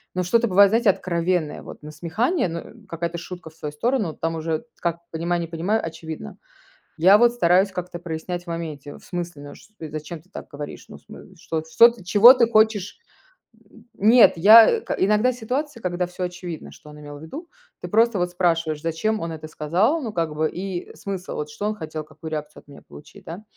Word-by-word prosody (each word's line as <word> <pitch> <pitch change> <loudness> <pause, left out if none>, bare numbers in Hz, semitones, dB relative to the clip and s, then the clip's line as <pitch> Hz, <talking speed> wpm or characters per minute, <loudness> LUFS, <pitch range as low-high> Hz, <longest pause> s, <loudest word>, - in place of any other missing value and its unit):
но 180 - 0
что-то 235 +6 +2
бывает, 200 +2 +6
знаете, 230 -2 +3
откровенное, 170 -3 -1
вот - - -11
насмехание, 170 - -1
ну, 170 +1 -4
э, - - -12 0.2
какая-то 170 +1 -4
шутка 175 -1 -9
в - - -22
свою 150 -2 -6
сторону. 215 - -1
Там 165 0 -3
уже 160 +5 -3 0.2
как 170 -1 -1
понимай- 170 +2 -1
не 165 - -4
понимай, 175 +7 -1
очевидно. 160 - -7 0.6
Я 190 +5 +7
вот 240 +1 +4
стараюсь 190 -3 +3
как-то 180 -1 -6
прояснять 175 +1 -5
в - - -32
моменте: 155 -4 -6
"В - - -20
смысле, 175 -4 -6
ну, 145 - -10
ш 215 - -19
Э, 160 - -6
зачем 155 +1 -7
ты 180 - -28
так - - -9
говоришь? 145 0 -9
Ну, - - -11
в - - -25
см - - -14
что, 160 -1 -3
что 230 +9 +6
ты 230 -6 -9
чего 220 +7 +8
ты 235 -2 +3
хочешь?" 215 - +1 0.7
М, 230 +1 -19
нет, 225 +4 +6
я 225 - +8
к - - -3
иногда 210 +6 +2
ситуация, 250 +2 -4
когда 180 0 -2
всё 180 +1 -6
очевидно, 175 -2 -6
что 150 - -15
он 150 0 -12
имел 145 0 -10
в - - -15
виду, 310 - -9 0.3
ты - - -5
просто 225 0 +3
вот 175 0 -1
спрашиваешь: 165 -4 0
зачем 170 +7 -1
он 165 0 -4
это 155 0 -8
сказал, 185 - 0
ну, 225 -4 -5
как 165 -3 -2
бы 155 0 0
и 185 -1 -6
смысл, 195 -2 -6
вот, 150 0 -4
что 180 +8 -6
он 215 - -2
хотел, 155 -3 -6
какую 160 +1 -10
реакцию 150 -1 -6
от - - -40
меня 140 - -13
получить, 150 - -15
да? 175 +6 -8
175 Hz, 210 wpm, -23 LUFS, 160-210 Hz, 0.7 s, чего